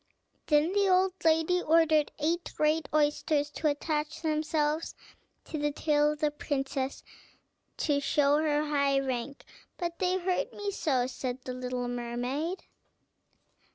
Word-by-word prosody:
Then 305 +3 +3
the 400 -1 +3
old 370 0 +3
lady 325 +2 +3
ordered 315 -2 +3
eight 335 +3 -1
great 305 0 +1
oysters 295 0 +1
to 310 - -1
attach 300 +2 -2
themselves 310 0 0 0.5
to 310 - -5
the 295 0 0
tail 295 0 +2
of 300 - -12
the 300 -1 +2
princess 270 -2 -3 0.7
to 290 -2 +1
show 285 +1 +3
her 300 -1 +1
high 280 -2 +2
rank. 265 +1 -4 0.3
"But 340 -2 -4
they 370 0 +1
hurt 365 0 -1
me 410 -1 -3
so," 270 -10 0
said 255 0 -5
the 255 - -5
little 250 -1 -3
mermaid. 245 +8 -3
300 Hz, 135 wpm, -29 LUFS, 280-325 Hz, 0.7 s, Then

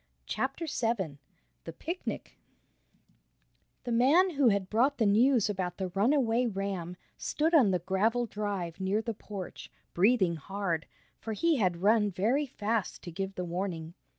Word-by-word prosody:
CHAPTER 270 - -2
VII 225 - -2 0.5
THE 165 - -6
PICNIC 340 - -5 1.5
The 245 - -4
man 290 +11 +4
who 280 -5 +3
had 200 -3 +2
brought 255 +8 +2
the 225 - +2
news 225 +3 +4
about 185 -4 -3
the 190 -2 -3
runaway 240 +4 +2
ram, 190 -4 -4 0.2
stood 320 +3 0
on 265 -11 +6
the 185 - +2
gravel 205 +7 +1
drive 200 -6 -4
near 195 +3 0
the 230 - -2
porch, 200 -3 -8 0.2
breathing 190 -3 +3
hard, 175 0 -3 0.3
for 220 - -4
he 325 +8 +2
had 180 -5 0
run 210 0 +4
very 225 +10 +1
fast 220 -3 -2
to 175 - -7
give 195 +3 -4
the 180 - -3
warning. 170 -2 -4
205 Hz, 150 wpm, -30 LUFS, 185-245 Hz, 1.5 s, on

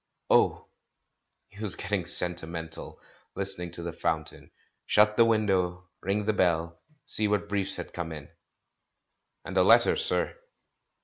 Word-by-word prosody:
Oh! - - +2 0.8
he 100 - -17
was 105 -4 -1
getting 95 -2 -3
sentimental, 85 -2 +2 0.4
listening 95 -3 0
to 85 - -6
the 85 -1 -5
fountain. - - -4 0.4
Shut 105 0 +3
the 115 - +5
window, 95 -5 0
ring 100 +2 -2
the 110 - +1
bell, 85 -3 -1 0.2
see 110 -6 -1
what 105 0 -1
briefs 100 -2 -1
had - - -8
come 85 -2 -5
in! 75 -3 -9 1.2
"And 95 - -7
a 90 - +5
letter, 115 +5 +5
sir." - - 0
95 Hz, 135 wpm, -27 LUFS, 85-105 Hz, 1.2 s, the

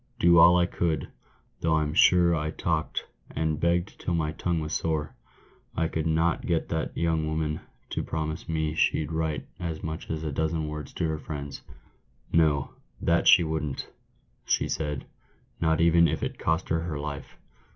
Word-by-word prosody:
Do 85 -1 +6
all 90 +2 +8
I 90 - +4
could— 85 -3 -1 0.5
though 80 -1 +2
I'm 75 -1 0
sure 85 0 +5
I 75 -1 -1
talked, 80 -1 -2 0.3
and 80 -1 0
begged 85 +3 0
till 90 - -1
my 75 -2 0
tongue 85 +1 -1
was 75 0 -4
sore 80 -2 -1 0.3
— - - -32
I 80 0 +1
could 80 0 -2
not 80 +1 +1
get 85 -3 0
that 80 0 -2
young 80 -2 +1
woman 80 0 -1 0.3
to - - -1
promise 80 0 -4
me 80 -1 0
she'd 80 -1 +1
write 80 -2 -2
as 80 -2 -4
much 80 0 -5
as 80 0 -3
a 75 - -2
dozen 80 +1 -1
words 75 -2 -6
to 80 - -1
her 80 -1 -2
friends. 70 -2 -6 0.7
'No, 75 -4 +3 0.3
that 85 0 +2
she 90 - +8
wouldn't,' 80 -3 -3 0.5
she - - +1
said, 75 -3 -3 0.3
' - - -35
not 80 -1 +2
even 85 0 +5
if - - -2
it - - -4
cost 80 +3 0
her 80 - +2
her 80 -2 -3
life 70 -1 -6
80 Hz, 180 wpm, -27 LUFS, 75-85 Hz, 0.7 s, all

